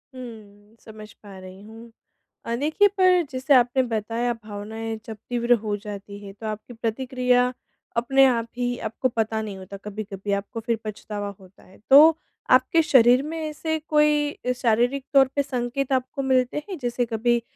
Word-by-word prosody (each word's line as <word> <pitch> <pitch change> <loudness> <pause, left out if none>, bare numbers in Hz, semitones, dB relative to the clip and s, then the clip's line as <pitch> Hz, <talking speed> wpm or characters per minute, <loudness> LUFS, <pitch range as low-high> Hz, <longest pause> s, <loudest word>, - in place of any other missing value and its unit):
हुँ, 215 -4 -12
समझ 215 -1 -12
पा 200 -2 -14
रही 185 +1 -12
हूँ। 225 +2 -13 0.5
अ, 230 - -2
देखिए 310 - +3
पर 365 -1 +5
जैसे 265 +2 +2
आपने 250 +1 +4
बताया 230 +1 -2
भावनाएँ 220 +2 -6
जब 220 -2 -7
तीव्र 240 0 +1
हो 210 -1 -1
जाती 205 -1 -9
है, 195 - -9
तो 215 +3 -9
आपकी 215 +3 -6
प्रतिक्रिया 250 +2 0 0.4
अपने 270 +3 +4
आप 235 -3 0
ही 245 0 -1
आपको 230 +4 -1
पता 220 -2 -1
नहीं 205 -3 -6
होता 190 +1 -9
कभी-कभी, 205 -1 -5
आपको 200 +3 -3
फिर 230 - +1
पछतावा 210 -1 -5
होता 190 0 -19
है। 190 - -19
तो 310 +4 +8 0.3
आपके 255 +6 +4
शरीर 255 -3 +5
में 320 +2 -5
ऐसे 315 0 -3
कोई 295 -3 +2
शारीरिक 245 +3 +1
तौर 270 -1 +6
पे 285 - +3
संकेत 260 +1 -3
आपको 260 +2 -1
मिलते 260 +2 +1
हैं? 370 -5 -5
जैसे 245 -1 -1
कभी 235 +1 0
240 Hz, 165 wpm, -24 LUFS, 215-265 Hz, 0.5 s, तो